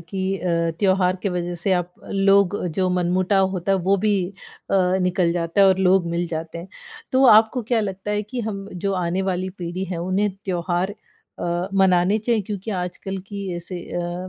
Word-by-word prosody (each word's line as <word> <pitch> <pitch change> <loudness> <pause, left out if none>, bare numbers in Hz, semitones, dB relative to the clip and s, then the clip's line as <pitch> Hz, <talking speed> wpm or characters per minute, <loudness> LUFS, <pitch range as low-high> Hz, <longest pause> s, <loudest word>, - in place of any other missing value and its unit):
कि 190 +3 -3
अ, 170 -2 0
त्योहार 190 -2 +2
के 200 - +1
वजह 175 0 -3
से 175 +3 -1
आप 180 -1 0 0.2
लोग 195 0 +3 0.2
जो 185 -1 +2
मनमुटाव 185 +2 +2
होता 190 +1 -1
है 195 - +2
वो 190 +2 +2
भी 210 +2 +1 0.6
अ, - - +2 0.3
निकल 180 -1 +1
जाता 170 +3 0
है 195 - +8
और 190 0 +3
लोग 190 -1 +3
मिल 170 +1 -1
जाते 165 0 -5
हैं। 170 +3 -9 0.4
तो 265 +1 +4
आपको 220 +2 +5
क्या 230 +1 +1
लगता 195 0 -4
है 210 0 0
कि 240 +4 -5
हम 200 -3 -5 0.2
जो 200 - +1
आने 180 +1 -1
वाली 185 0 -2
पीढ़ी 175 +1 -4
है 180 -2 -4
उन्हें 190 +3 +1
त्योहार 180 +1 -1 0.4
अ, 175 +2 -2
मनाने 190 +1 +4
चाहिए 225 +1 +1
क्योंकि 200 +2 -5
आजकल 185 0 -4
की 200 -1 -6
ऐसे 175 +1 -6
अ, 175 +1 -3
185 Hz, 190 wpm, -22 LUFS, 175-200 Hz, 0.6 s, है